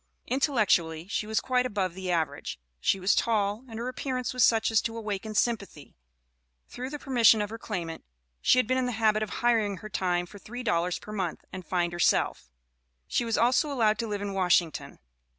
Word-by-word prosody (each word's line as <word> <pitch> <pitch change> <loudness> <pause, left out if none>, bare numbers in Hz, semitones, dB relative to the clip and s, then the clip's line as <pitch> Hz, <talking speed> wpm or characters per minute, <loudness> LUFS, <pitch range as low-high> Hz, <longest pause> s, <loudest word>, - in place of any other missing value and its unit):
Intellectually, 195 - +1
she 210 +1 -2
was 220 0 +1
quite 250 -1 +1
above 195 -6 -2
the 185 0 -6
average; 160 - -2 0.2
she 195 - +1
was 190 +2 +3
tall, 210 0 +1
and 225 - -7
her 235 +2 -3
appearance 255 -1 -3
was 250 -2 +3
such 225 0 +4
as 220 - +4
to 230 0 -4
awaken 215 -1 -4
sympathy. 205 - -2 0.7
Through 255 +1 -6
the 295 - -5
permission 240 -6 +4
of 210 0 -2
her 225 - -6
claimant 170 -7 -5 0.4
she - - +4
had 255 - +4
been 255 +3 +1
in 255 - 0
the 245 - -2
habit 215 -1 +2
of 215 - -2
hiring 225 -5 +1
her 215 +5 -9
time 180 -3 0
for 205 +3 -13
three 245 +6 -7
dollars 175 -5 0
per 210 - -11
month 190 -5 -3
and 185 - -6
find 175 -1 -1
herself; 175 - +1 0.6
she - - 0
was 230 -1 0
also 255 +5 +3
allowed 220 -5 +2
to 230 - -2
live 205 -1 -3
in 200 -1 -3
Washington. 180 -4 +1
215 Hz, 200 wpm, -28 LUFS, 185-240 Hz, 0.7 s, such